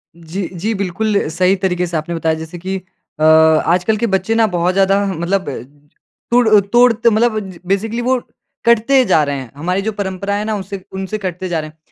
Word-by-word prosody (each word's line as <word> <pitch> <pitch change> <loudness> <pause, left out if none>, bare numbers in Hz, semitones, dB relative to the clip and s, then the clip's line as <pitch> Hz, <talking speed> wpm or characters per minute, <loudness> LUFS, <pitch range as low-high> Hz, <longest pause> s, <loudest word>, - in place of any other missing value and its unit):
जी, 170 +3 -5
जी 200 +6 -2
बिल्कुल 200 +2 -1
सही 180 +4 +2
तरीके 180 -2 -1
से 170 - -2
आपने 160 +2 -4
बताया 160 -1 0
जैसे 160 +2 -8
कि 190 +2 -4 0.4
अ, - - 0
आजकल 160 +6 +4
के 235 +2 0
बच्चे 195 +2 0
ना 225 0 +4
बहुत 180 -1 0
ज़्यादा 195 +1 +2
मतलब 185 -1 -1 0.8
तुड़ 240 -1 +4
अ, 215 - +7
तुड़त 235 +3 +3
मतलब 225 0 +3 0.3
बेसिकली 215 +5 -1
वो 255 +1 +1 0.5
कटते 235 +3 +4
जा 170 -7 +3
रहे 145 -1 -2
हैं। 130 -3 -9
हमारे 180 +6 -1
जो 220 +2 -2
परंपरा 200 -1 -3
है 205 +1 -2
ना, 220 0 -1
उससे 195 -1 -7
उनसे 190 +2 -4
कटते 185 -2 -4
जा 165 - -1
रहे 155 0 -6
हैं। 155 - -22
190 Hz, 195 wpm, -17 LUFS, 170-215 Hz, 0.8 s, अ